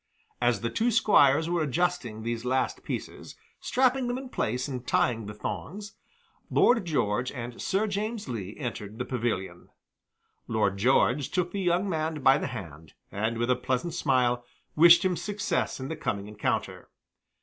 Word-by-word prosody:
As 120 -1 +2
the 115 - -2
two 235 +2 +1
squires 160 - +4
were 170 -1 0
adjusting 140 -7 -1
these 115 0 -3
last 130 +1 0
pieces, - - -6 0.2
strapping 260 0 +1
them 245 +1 -1
in 260 0 -7
place 125 - -2
and 130 -3 -6
tying 115 -4 +1
the 105 - -6
thongs, 170 - -6 0.6
Lord 230 -6 +4
George 125 -6 0
and 120 -2 -7
Sir 195 +3 +1
James 215 0 -3
Lee 105 -5 -5
entered 110 -6 -5
the 125 - -3
pavilion. 110 -8 -3 0.8
Lord 105 -3 +1
George 125 +4 +2
took 180 -1 -1
the 200 - -3
young 180 +2 +1
man 160 -4 -2
by 135 +1 +6
the - - -2
hand, 85 - -9 0.2
and 110 +3 -1
with 120 +2 +1
a - - +4
pleasant 130 +6 -2
smile 125 -6 +1 0.3
wished 170 +4 +7
him 185 -1 +2
success 200 -1 -2
in 130 - -5
the 160 - -4
coming 100 -10 -3
encounter. 105 0 -3
130 Hz, 160 wpm, -28 LUFS, 115-175 Hz, 0.8 s, wished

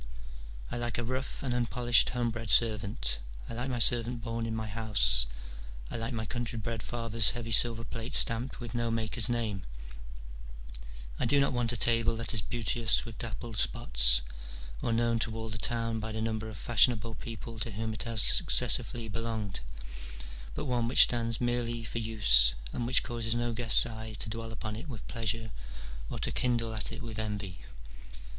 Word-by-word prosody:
I - - -2
like 120 0 -2
^ - - -1
a 120 - -1
rough 130 +4 -4
and 130 -3 -1
unpolished 120 0 +3
homebred 120 -2 -2
servant, 100 - +2 0.3
I - - -6
like 120 +3 -3
my 125 - -1
servant 120 0 +3
born 115 -1 -3
in 110 - -3
my 110 0 -3
house: 105 - +4 0.6
I - - -4
like 115 +2 -2
my 110 -2 -3
country 120 +1 -3
bred 115 +1 -3
father's 115 -2 +2
heavy 115 -1 -5
silver 115 +1 +4
plate 115 +3 -5
stamped 115 +3 +1
with 120 -2 -7
no 120 -1 0
maker's 115 +1 0
name: 110 -5 -1 1.6
I - - +1
do 145 - +4
not 140 -1 +2
want 120 -1 +1
a 120 - -1
table 115 0 +3
that 115 +2 -1
is 110 - +1
beauteous 115 +1 +1
with 115 -2 -9
dappled 115 -1 -5
spots, - - +3 0.6
or - - -1
known 115 0 +2
to 115 -1 -1
all 110 0 -5
the 110 +1 -5
town 115 -1 0
by 110 0 -4
the 110 - -4
number 110 0 -2
of 110 - -8
fashionable 115 0 +3
people 115 +1 -8
to 110 - -2
whom 110 +1 -3
it 110 - -6
has 115 -3 +1
successively 115 -2 +1
belonged, 110 -2 -3 1.0
but - - -3
one 120 -3 0
which 125 - +9
stands 115 -1 0
merely 120 -1 -1
for 115 +1 -4
use, 75 - +4 0.2
and 120 - -2
which 130 - +3
causes 115 -1 -2
no 120 0 -1
guest's 115 -1 +3
eye 110 -1 -7
to 110 - -3
dwell 115 0 -5
upon 110 -1 -5
it 140 +8 -8
with 115 -7 -8
pleasure 115 -1 -3 0.6
or - - -4
to - - -2
kindle 120 -2 0
at 110 - -2
it - - -7
with 110 -2 -6
envy. 105 -4 -4
115 Hz, 185 wpm, -30 LUFS, 110-120 Hz, 1.6 s, which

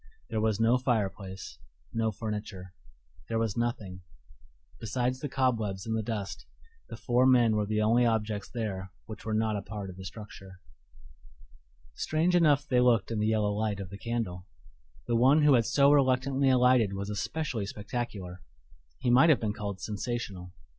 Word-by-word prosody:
There 110 - 0
was 110 -1 +1
no 115 +3 +3
fireplace, 100 - -3 0.3
no 115 -1 0
furniture; 105 -4 -6 0.6
there 115 - 0
was 115 -3 -1
nothing: 110 -6 -3 0.8
besides 125 +3 -1
the 145 - -4
cobwebs 110 -8 -1
and 110 0 -1
the 110 - 0
dust, 105 -3 -5 0.4
the - - -7
four 125 +1 +2
men 120 -4 +5
were 105 -1 0
the 110 0 0
only 115 +3 +4
objects 110 -3 -1
there 95 -5 -4 0.2
which 110 -1 -10
were 110 - -2
not 110 -1 +1
a - - -3
part 100 -1 -6
of 90 - -14
the 95 - -8
structure. 95 -1 -10 1.3
Strange 160 - 0
enough 150 -4 +4
they 125 -3 +3
looked 120 -4 +3
in 110 - -1
the 105 - +1
yellow 105 -2 +1
light 105 -1 -1
of 95 -2 -7
the 100 - -7
candle. 105 -7 -4 0.6
The 120 - 0
one 135 +6 +5
who 145 -1 +6
had 115 -3 +3
so 140 0 +4
reluctantly 135 0 +3
alighted 125 -5 +4
was 100 +1 -4
especially 115 0 -3
spectacular 105 -4 -5 0.6
he 120 - 0
might 135 +7 +6
have 150 - +5
been 105 -2 -2
called 100 -3 -5
sensational. 105 -4 -4
110 Hz, 165 wpm, -29 LUFS, 100-125 Hz, 1.3 s, who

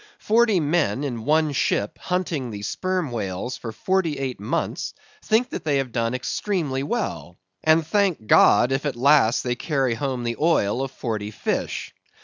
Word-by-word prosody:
Forty 220 -3 +3
men 145 -6 +1
in 120 -6 -4
one 155 +1 +3
ship 105 -6 0
hunting 170 -8 -2
the 100 -2 -7
Sperm 185 - -2
Whales 105 +2 -3
for 115 - -6
forty 170 - 0
eight 130 -4 -3
months 130 +12 -3 0.3
think 225 +3 +2
they 145 -3 -1
have 135 -3 -2
done 115 +1 -1
extremely 145 - -2
well, 90 - -3 0.3
and 160 0 +4
thank 185 - +1
God, 115 +3 +5
if 135 +2 0
at 140 - -2
last 130 -2 +4
they 125 - 0
carry 135 -1 0
home 130 0 -3
the 115 -1 -2
oil 135 -8 +2
of 135 - -2
forty 110 -5 -4
fish. 105 - -3
135 Hz, 160 wpm, -23 LUFS, 115-165 Hz, 0.3 s, God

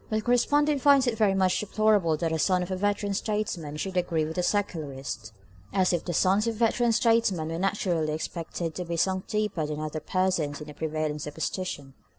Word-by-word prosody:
But 215 - -1
the 215 - +1
correspondent 285 +4 +2
finds 280 -1 +5
it 240 -3 0
very 210 -3 +2
much 185 -1 +2
more 205 - -9
deplorable 210 -7 +3
that 165 0 -1
a 160 - -1
son 180 +2 +2
of 180 - -6
a - - 0
veteran 205 +1 0
statesman 190 -8 -2
should 190 +4 -4
agree 170 -3 +1
with 160 +1 -5
the 180 - +1
Secularist—as 135 - -2
if 175 - -1
the 175 - -2
sons 195 +6 +3
of 230 - -1
veteran 235 +1 +2
statesmen 225 -8 +2
were 165 +1 -3
naturally 180 -5 0
expected 165 +1 -4
to 180 - -5
be 170 0 -3
sunk 190 +2 0
deeper 210 -7 -1
than 150 0 -4
other 155 0 -3
persons 175 -5 0
in 150 - -7
the 150 - -10
prevailing 155 0 -2
superstition. 150 -1 -4
180 Hz, 200 wpm, -27 LUFS, 155-210 Hz, -, finds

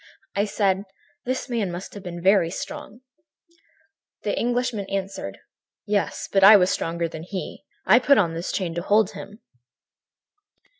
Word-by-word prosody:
"I 200 +1 +2
said: 200 -2 0 0.4
"'This 255 +2 -2
man 225 -7 -1
must 175 +2 -7
have 205 - -8
been 175 -2 -7
very 190 -3 +4
strong.' 260 - -7 1.2
"The 205 - -1
Englishman 240 -3 -1
answered 195 - -4
quietly: - - -23 0.5
"'Yes, 205 -1 -1
but 195 -1 +4
I 205 +2 +10
was 180 -1 +3
stronger 170 0 -1
than 160 -1 -8
he. 185 +2 -7 0.2
I 215 +6 +6
put 280 +2 +4
on 170 -5 +2
this 170 +2 -4
chain 180 -4 -2
to 170 - -3
hold 205 +2 +3
him.' 210 +3 -11
195 Hz, 155 wpm, -24 LUFS, 180-215 Hz, 1.2 s, I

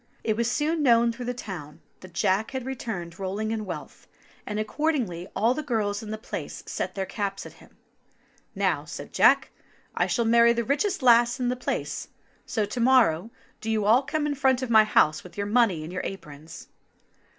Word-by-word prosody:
It 220 - 0
was 235 +1 0
soon 310 +5 0
known 235 -3 +4
through 245 +1 -7
the 245 - -1
town 175 -10 -8 0.2
that 185 -2 -14
Jack 195 +4 +1
had 260 -2 -5
returned 205 -10 -5
rolling 200 +3 -3
in 220 -1 -3
wealth, 180 - -8 0.4
and 210 0 -3
accordingly 215 - -1
all 225 +5 +3
the 305 - -3
girls 215 -7 -1
in 220 - -8
the 215 - -3
place 220 - -7
set - - -4
their 195 -1 -2
caps 200 -1 -4
at - - -10
him. - - -20 0.8
*'Now," - - 0
said - - -9
Jack, - - +4 0.4
"I - - +1
shall 235 - 0
marry 235 +1 +5
the 235 0 -1
richest 300 - 0
lass 240 +1 +5
in 245 -1 0
the 250 - 0
place; 250 - -3 0.4
so 220 -3 0
to 210 +5 -5
morrow 230 -7 +4 0.3
do 225 - -5
you 215 -2 +1
all 230 +5 +5
come 300 +2 -2
in 295 - 0
front 265 -2 +2
of 245 - -3
my 220 -1 +7
house 155 -7 +3
with 180 - -14
your 200 - -1
money 205 -7 +2
in 160 - -7
your 180 - -3
aprons." 160 -4 -9
225 Hz, 195 wpm, -26 LUFS, 195-250 Hz, 0.8 s, my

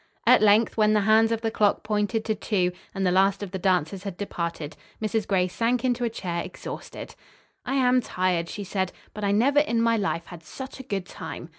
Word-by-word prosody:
At - - +6
length, 215 +2 +4
when 215 -1 +4
the 210 - +3
hands 220 +2 +4
of 225 -1 -1
the 225 - -1
clock 210 -2 +2
pointed 215 +1 -1
to 220 - +1
two, 195 -4 0 0.2
and 195 0 -1
the 180 - +3
last 195 +2 +3
of 195 - -6
the 190 - -4
dancers 185 0 0
had 195 -3 -6
departed, 170 -6 -4 0.2
Mrs. 215 0 -1
Gray 185 -2 +2
sank 235 +7 0
into 245 -1 0
a 235 - +1
chair 175 -6 -3
exhausted. 185 - -8 0.5
"I 270 - 0
am 255 -1 +4
tired," 180 -5 -1
she 205 - -5
said, 190 -1 -2 0.2
"but 210 - -7
I 200 - +2
never 260 +8 +4
in 235 -6 +1
my 230 0 +3
life 195 -5 -2
had 175 -2 -11
such 265 - -9
a - - -7
good 195 -6 -3
time!" 170 - -8
205 Hz, 215 wpm, -25 LUFS, 185-225 Hz, 0.5 s, At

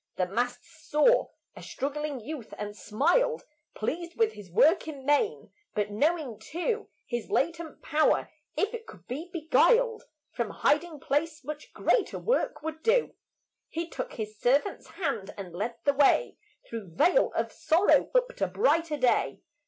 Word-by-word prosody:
The 185 - +1
Master 245 +6 -2
saw 315 +9 +2 0.3
a - - -10
struggling 290 0 -3
youth, 260 0 -7
and 210 0 -5
smiled, 475 - +1 0.3
Pleased 340 +9 -3
with 445 -1 +3
his 200 -3 -11
work 315 - +4
in 280 -4 -7
main; 415 +11 +1 0.2
but, 210 0 0
knowing 285 -1 0
too 355 - -3 0.2
His 240 -1 -4
latent 330 +1 -1
power, 310 0 +2 0.3
if 420 +3 +1
it 460 -1 -7
could 175 -3 -13
be 295 +9 -5
beguiled 455 +8 +3 0.3
From 235 -4 -2
hiding 305 0 +1
place, 310 +3 -1
much 300 0 -7
greater 450 - +1
work 485 -10 0
would 320 0 -5
do, 470 +5 +2 0.6
He 330 +1 -3
took - - -5
His 215 -2 -6
servant's 280 - +1
hand 225 - -3
and 185 -4 -7
led 220 +7 -3
the 285 - +3
way 285 - +3 0.3
Through 200 -8 -7
vale 370 - +4
of - - -1
sorrow 345 +5 +3
up - - +2
to - - +1
brighter 330 -8 +1
day. 240 - +1
300 Hz, 150 wpm, -28 LUFS, 235-350 Hz, 0.6 s, work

